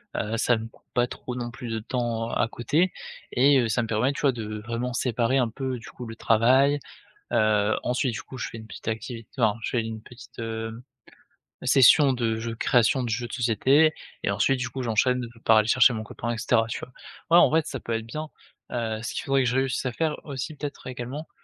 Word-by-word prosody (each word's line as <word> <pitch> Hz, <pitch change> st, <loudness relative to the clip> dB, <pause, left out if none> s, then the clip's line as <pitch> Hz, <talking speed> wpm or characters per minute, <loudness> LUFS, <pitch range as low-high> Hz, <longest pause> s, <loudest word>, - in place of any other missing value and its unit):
heu, 110 Hz, +2 st, -1 dB
ça 120 Hz, +1 st, +3 dB
me 110 Hz, 0 st, -6 dB
coûte 115 Hz, -, -23 dB
pas 120 Hz, 0 st, +2 dB
trop 125 Hz, -, -7 dB
non 120 Hz, -1 st, -4 dB
plus 120 Hz, 0 st, -8 dB
de 115 Hz, 0 st, -2 dB
temps 115 Hz, 0 st, -2 dB
à 115 Hz, -, +1 dB
côté 150 Hz, +11 st, 0 dB, 0.4 s
et 140 Hz, +3 st, +5 dB
heu, 120 Hz, -, 0 dB
ça 115 Hz, +2 st, +1 dB
me 115 Hz, -, -3 dB
permet, 115 Hz, +5 st, +1 dB
tu -, -, -6 dB
vois? 140 Hz, -2 st, +4 dB
De 110 Hz, -3 st, -5 dB
vraiment 120 Hz, +3 st, -3 dB
séparer 120 Hz, +1 st, +1 dB
un 120 Hz, -3 st, +1 dB
peu, 130 Hz, +1 st, -4 dB
du 115 Hz, -, -11 dB
coup, 125 Hz, -, -9 dB
le 115 Hz, -1 st, -8 dB
travail, 130 Hz, +6 st, +4 dB, 0.5 s
heu, 110 Hz, -1 st, +3 dB
ensuite 125 Hz, +1 st, 0 dB
du -, -, -5 dB
coup, 130 Hz, -, -10 dB
je 115 Hz, -, -3 dB
fais -, -, -9 dB
une 110 Hz, -, -10 dB
petite -, -, -11 dB
activité 115 Hz, 0 st, -4 dB
enfin, 110 Hz, -2 st, +3 dB
je -, -, -3 dB
fais 120 Hz, -, +1 dB
une 110 Hz, -1 st, -6 dB
petite, 120 Hz, +1 st, -14 dB
heu, 115 Hz, 0 st, -4 dB, 0.8 s
session 135 Hz, +2 st, +6 dB
de 115 Hz, -3 st, -1 dB
jeux 115 Hz, 0 st, -4 dB
création 125 Hz, +3 st, +3 dB
de 120 Hz, -, -3 dB
jeux 120 Hz, +2 st, -2 dB
de -, -, -11 dB
société 135 Hz, +6 st, +3 dB, 0.3 s
et 100 Hz, -, +1 dB
ensuite, 125 Hz, +7 st, +2 dB
du 125 Hz, 0 st, -2 dB
coup, 130 Hz, +2 st, -5 dB
j'enchaîne 125 Hz, +2 st, +1 dB, 0.2 s
par 110 Hz, -, +6 dB
aller 110 Hz, 0 st, +3 dB
chercher 125 Hz, +1 st, +6 dB
mon 110 Hz, -1 st, -4 dB
copain 120 Hz, +2 st, -5 dB
et -, -, -5 dB
cetera, 115 Hz, 0 st, +2 dB
tu 115 Hz, -, -4 dB
vois? 125 Hz, -, -9 dB, 0.4 s
Ouais, 170 Hz, -, +7 dB
en -, -, +7 dB
vrai 160 Hz, +1 st, +3 dB
ça 135 Hz, -2 st, -5 dB
peut 115 Hz, -, -4 dB
être 115 Hz, 0 st, -2 dB
bien, 155 Hz, +7 st, -5 dB, 0.5 s
heu, 115 Hz, -2 st, -2 dB
ce 115 Hz, -, -4 dB
qu'il -, -, -3 dB
faudrait 135 Hz, -1 st, +2 dB
que -, -, +2 dB
je 125 Hz, -, -1 dB
réussisse 135 Hz, 0 st, 0 dB
à 125 Hz, -, -1 dB
faire 155 Hz, +3 st, -1 dB
aussi, 140 Hz, +2 st, -5 dB
peut-être, 145 Hz, -1 st, -7 dB
également, 130 Hz, +5 st, -6 dB
120 Hz, 235 wpm, -26 LUFS, 115-130 Hz, 0.8 s, Ouais